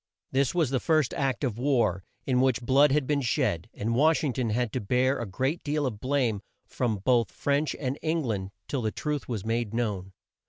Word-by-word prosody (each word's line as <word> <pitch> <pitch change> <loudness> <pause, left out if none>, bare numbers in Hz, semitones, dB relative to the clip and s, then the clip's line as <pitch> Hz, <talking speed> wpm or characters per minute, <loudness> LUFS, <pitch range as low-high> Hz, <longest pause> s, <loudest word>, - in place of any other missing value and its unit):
This 135 +3 +1
was 160 -7 +2
the 130 - +1
first 155 -3 +2
act 135 0 -1
of 120 -4 -1
war, 120 -9 +1 0.2
in 125 -2 +2
which 130 -2 +2
blood 135 +3 +5
had 145 -1 +2
been 145 +1 +1
shed, 115 - 0
and 115 +3 -2
Wash 155 +6 +3
ing 140 -4 0
ton 125 -3 -1
had 115 0 -1
to - - -1
bear 125 +6 +1
a 120 - -3
great 130 - -2
deal 150 0 0
of 110 -6 -3
blame 125 -5 0 0.2
from 120 -4 -1
both 120 +3 +2
France 145 +1 0
and 135 0 -3
Eng 160 0 0
land 100 -6 -2 0.2
till 135 - -2
the 110 - 0
truth 150 +1 -3
was 110 -4 -3
made 115 -1 -1
known. 100 -5 -2
125 Hz, 210 wpm, -27 LUFS, 115-140 Hz, 0.2 s, blood